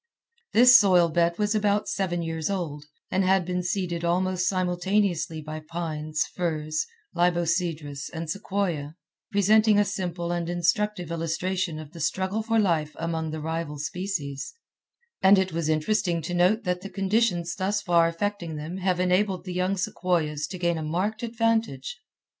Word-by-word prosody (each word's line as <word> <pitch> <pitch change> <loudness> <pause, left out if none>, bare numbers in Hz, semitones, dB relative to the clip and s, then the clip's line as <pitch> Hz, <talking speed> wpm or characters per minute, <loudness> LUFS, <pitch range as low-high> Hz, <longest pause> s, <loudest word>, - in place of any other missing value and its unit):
This 250 +2 +9
soil 180 -4 +4
bed 170 +1 +1
was 210 0 +1
about 210 -1 +1
seven 175 -3 -1
years 165 0 -2
old, 160 -7 -3 0.3
and 190 - +2
had 190 -1 +3
been 180 0 -1
seeded 175 -2 -2
almost 180 +1 +1
simultaneously 180 -3 0
by 155 +1 -6
pines, 155 -1 -3
firs, 155 -3 -2 0.3
libocedrus, 170 -4 0
and 165 0 -5
sequoia, 175 -5 -2 0.4
presenting 210 +1 +4
a 205 - +4
simple 180 -3 -3
and 175 -1 -2
instructive 175 +1 0
illustration 170 +1 -2
of 155 -1 -9
the 170 - -11
struggle 190 +6 -1
for 225 +1 0
life 165 -8 +1
among 165 -1 -2
the 155 0 -5
rival 160 -1 -3
species; 150 - -4 0.7
and 195 +1 +7
it 190 -2 0
was 165 -1 -1
interesting 170 +2 +1
to 175 - -4
note 185 +6 +3
that 180 -2 -1
the 195 - -7
conditions 195 -4 +1
thus 205 +2 -1
far 170 -2 +4
affecting 170 -1 -3
them 155 +5 -5
have 185 -1 0
enabled 185 +1 +1
the 185 - -6
young 185 +2 0
sequoias 170 -6 -1
to 185 - -6
gain 170 -2 0
a - - -4
marked 185 +8 -1
advantage. 230 - -1
175 Hz, 155 wpm, -26 LUFS, 165-195 Hz, 0.7 s, This